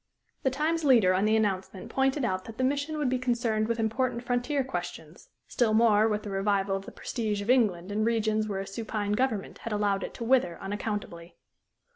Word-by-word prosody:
The 265 Hz, -, +2 dB
Times 310 Hz, +5 st, 0 dB
leader 230 Hz, -10 st, +5 dB
on 190 Hz, +3 st, +2 dB
the 215 Hz, +1 st, +3 dB
announcement 195 Hz, -3 st, -1 dB
pointed 270 Hz, 0 st, +1 dB
out 185 Hz, -4 st, -2 dB
that 225 Hz, -1 st, -10 dB
the 260 Hz, -, -1 dB
mission 285 Hz, +3 st, 0 dB
would 295 Hz, -3 st, 0 dB
be 255 Hz, 0 st, 0 dB
concerned 235 Hz, -3 st, 0 dB
with 230 Hz, 0 st, -1 dB
important 235 Hz, +2 st, 0 dB
frontier 245 Hz, +3 st, 0 dB
questions, 175 Hz, -7 st, -7 dB, 0.2 s
still 225 Hz, -3 st, +1 dB
more 220 Hz, -1 st, +5 dB
with 210 Hz, -1 st, -1 dB
the 205 Hz, -, -6 dB
revival 195 Hz, 0 st, +1 dB
of 195 Hz, 0 st, -5 dB
the -, -, -7 dB
prestige 215 Hz, -4 st, -3 dB
of 205 Hz, +4 st, +1 dB
England 205 Hz, -7 st, +2 dB
in 215 Hz, +1 st, 0 dB
regions 220 Hz, -1 st, +1 dB
where 195 Hz, -2 st, -2 dB
a -, -, -5 dB
supine 210 Hz, 0 st, -3 dB
government 220 Hz, -2 st, -1 dB
had 230 Hz, -, -6 dB
allowed 200 Hz, -2 st, +1 dB
it -, -, -6 dB
to -, -, -5 dB
wither 230 Hz, -8 st, +2 dB
unaccountably. 195 Hz, -4 st, -5 dB
220 Hz, 200 wpm, -28 LUFS, 200-250 Hz, 0.2 s, leader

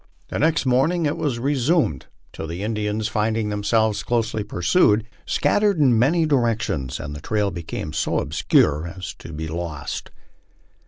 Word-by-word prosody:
The -, -, -3 dB
next 155 Hz, -1 st, +2 dB
morning 155 Hz, +7 st, +2 dB
it 145 Hz, -, 0 dB
was 135 Hz, -6 st, -1 dB
resumed, 135 Hz, -, +1 dB, 0.3 s
until 80 Hz, -, -6 dB
the 85 Hz, +4 st, -5 dB
Indians 105 Hz, 0 st, -1 dB
finding 110 Hz, 0 st, 0 dB
themselves 105 Hz, +1 st, +1 dB
closely 110 Hz, -2 st, -1 dB
pursued, 105 Hz, +5 st, +2 dB, 0.2 s
scattered 205 Hz, +6 st, +2 dB
in 130 Hz, -7 st, +4 dB
many 160 Hz, +7 st, +3 dB
directions 115 Hz, -, 0 dB
and 75 Hz, 0 st, -6 dB
the 75 Hz, -, -8 dB
trail 105 Hz, +1 st, 0 dB
became 80 Hz, -3 st, -5 dB
so -, -, 0 dB
obscure 75 Hz, +2 st, +2 dB
as 90 Hz, +1 st, -7 dB
to -, -, -9 dB
be 80 Hz, +1 st, -5 dB
lost. 80 Hz, -3 st, -5 dB
110 Hz, 150 wpm, -22 LUFS, 85-130 Hz, 0.3 s, in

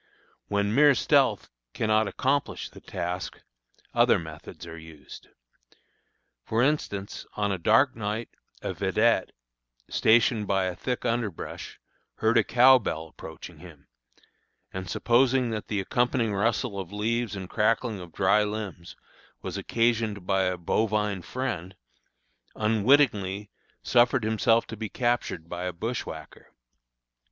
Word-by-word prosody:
When 100 Hz, 0 st, 0 dB
mere 145 Hz, +1 st, +6 dB
stealth 130 Hz, -, +2 dB, 0.2 s
cannot 110 Hz, -1 st, +2 dB
accomplish 135 Hz, +6 st, -1 dB
the -, -, -13 dB
task, 90 Hz, 0 st, -5 dB, 0.5 s
other -, -, +4 dB
methods 80 Hz, -2 st, -9 dB
are 80 Hz, -, -8 dB
used. 80 Hz, -2 st, -13 dB, 1.2 s
For 115 Hz, +2 st, +1 dB
instance, 105 Hz, -9 st, -2 dB
on 105 Hz, -1 st, 0 dB
a 95 Hz, -, -2 dB
dark 115 Hz, +9 st, +4 dB
night, 110 Hz, +1 st, -3 dB, 0.3 s
a -, -, -2 dB
vedette, -, -, +2 dB, 0.6 s
stationed 110 Hz, -1 st, +3 dB
by 95 Hz, -1 st, +2 dB
a 90 Hz, -1 st, -3 dB
thick 125 Hz, +7 st, -3 dB
underbrush, 115 Hz, -6 st, -3 dB, 0.4 s
heard -, -, +3 dB
a -, -, +3 dB
cow 130 Hz, +2 st, +6 dB
bell 80 Hz, -7 st, -4 dB
approaching 80 Hz, +1 st, -11 dB
him, 80 Hz, -4 st, -14 dB, 0.8 s
and 95 Hz, -1 st, -5 dB
supposing 125 Hz, +2 st, +2 dB
that 110 Hz, -1 st, -4 dB
the 105 Hz, -, -1 dB
accompanying 120 Hz, +2 st, 0 dB
rustle 105 Hz, +1 st, 0 dB
of 95 Hz, -1 st, -6 dB
leaves 110 Hz, +1 st, -1 dB
and 95 Hz, -2 st, -6 dB
crackling 110 Hz, +1 st, 0 dB
of 90 Hz, -2 st, -10 dB
dry 100 Hz, +5 st, +3 dB
limbs 105 Hz, -5 st, -5 dB, 0.5 s
was -, -, -5 dB
occasioned 115 Hz, -4 st, 0 dB
by 95 Hz, 0 st, +2 dB
a 90 Hz, 0 st, -1 dB
bovine 105 Hz, +2 st, 0 dB
friend, 95 Hz, -5 st, -4 dB, 0.8 s
unwittingly 105 Hz, -3 st, +2 dB, 0.3 s
suffered 125 Hz, 0 st, +3 dB
himself 115 Hz, +1 st, +2 dB
to 115 Hz, -, -7 dB
be 110 Hz, 0 st, -5 dB
captured 120 Hz, -9 st, -1 dB
by 90 Hz, +1 st, -5 dB
a 90 Hz, -, -1 dB
bushwhacker. 90 Hz, -4 st, -6 dB
105 Hz, 125 wpm, -27 LUFS, 95-120 Hz, 1.2 s, mere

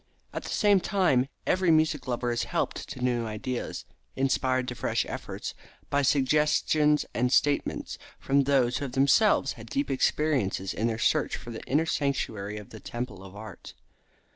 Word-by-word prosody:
At -, -, -3 dB
the -, -, -8 dB
same 205 Hz, -3 st, +4 dB
time, 175 Hz, -10 st, +2 dB, 0.2 s
every 185 Hz, -1 st, +2 dB
music 155 Hz, -3 st, +2 dB
lover 120 Hz, -1 st, -1 dB
is 120 Hz, -, -1 dB
helped -, -, -2 dB
to 125 Hz, -, -6 dB
new 120 Hz, -2 st, 0 dB
ideas, 115 Hz, +3 st, -4 dB, 0.3 s
inspired 130 Hz, -1 st, +1 dB
to -, -, -4 dB
fresh -, -, -1 dB
efforts, -, -, -6 dB, 0.4 s
by 145 Hz, -, +3 dB
suggestions 150 Hz, +2 st, +3 dB
and 125 Hz, +1 st, +1 dB
statements 145 Hz, +1 st, +1 dB, 0.2 s
from 140 Hz, 0 st, +2 dB
those 130 Hz, -3 st, +2 dB
who 145 Hz, -, -3 dB
have 125 Hz, -, -7 dB
themselves 140 Hz, +3 st, +4 dB
had 115 Hz, -1 st, -12 dB
deep 140 Hz, +3 st, -1 dB
experiences 130 Hz, -9 st, 0 dB
in 110 Hz, -, 0 dB
their 115 Hz, -1 st, -1 dB
search -, -, +1 dB
for 120 Hz, -, -9 dB
the 110 Hz, -, -7 dB
inner 150 Hz, +4 st, +2 dB
sanctuary 110 Hz, -9 st, -2 dB
of 105 Hz, -2 st, -10 dB
the 110 Hz, -, -9 dB
Temple 120 Hz, -5 st, -6 dB
of 95 Hz, 0 st, -12 dB
Art. 110 Hz, +1 st, -10 dB
130 Hz, 165 wpm, -28 LUFS, 120-150 Hz, 0.4 s, same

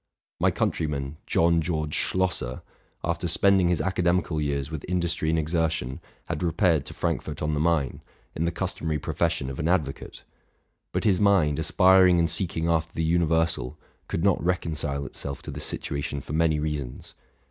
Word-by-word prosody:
My -, -, +4 dB
countryman, 75 Hz, -2 st, -2 dB
John 85 Hz, 0 st, +3 dB
George 75 Hz, -2 st, -2 dB
Schlosser, 85 Hz, -9 st, 0 dB, 0.4 s
after 85 Hz, +1 st, -1 dB
spending 95 Hz, 0 st, +4 dB
his 90 Hz, -, +1 dB
academical 90 Hz, -3 st, +1 dB
years 70 Hz, 0 st, -2 dB
with 80 Hz, -3 st, -5 dB
industry 85 Hz, -3 st, 0 dB
and 80 Hz, -, +2 dB
exertion, 80 Hz, -4 st, -1 dB, 0.3 s
had 75 Hz, -, -4 dB
repaired 85 Hz, -3 st, +2 dB
to -, -, -8 dB
Frankfort -, -, -2 dB
on 75 Hz, 0 st, 0 dB
the 75 Hz, -, 0 dB
Main, 80 Hz, -5 st, +1 dB, 0.3 s
in 80 Hz, -, -1 dB
the 85 Hz, -, +1 dB
customary 80 Hz, -3 st, -2 dB
profession 65 Hz, -, -1 dB
of 65 Hz, 0 st, -6 dB
an 75 Hz, -, 0 dB
advocate; 80 Hz, -6 st, -1 dB, 0.7 s
but -, -, -1 dB
his 95 Hz, -4 st, +3 dB
mind, 95 Hz, -8 st, +3 dB
aspiring 95 Hz, -1 st, +5 dB
and 85 Hz, 0 st, +2 dB
seeking 85 Hz, -3 st, -1 dB
after 80 Hz, -1 st, +1 dB
the 80 Hz, -, -1 dB
universal, 80 Hz, -4 st, +1 dB, 0.3 s
could 80 Hz, -, -2 dB
not 100 Hz, -2 st, +2 dB
reconcile 75 Hz, -6 st, -1 dB
itself 70 Hz, 0 st, -6 dB
to -, -, -6 dB
this -, -, -5 dB
situation 70 Hz, 0 st, -3 dB
for 70 Hz, -, -8 dB
many 80 Hz, -1 st, +2 dB
reasons. 75 Hz, -5 st, -4 dB
80 Hz, 160 wpm, -26 LUFS, 75-85 Hz, 0.7 s, aspiring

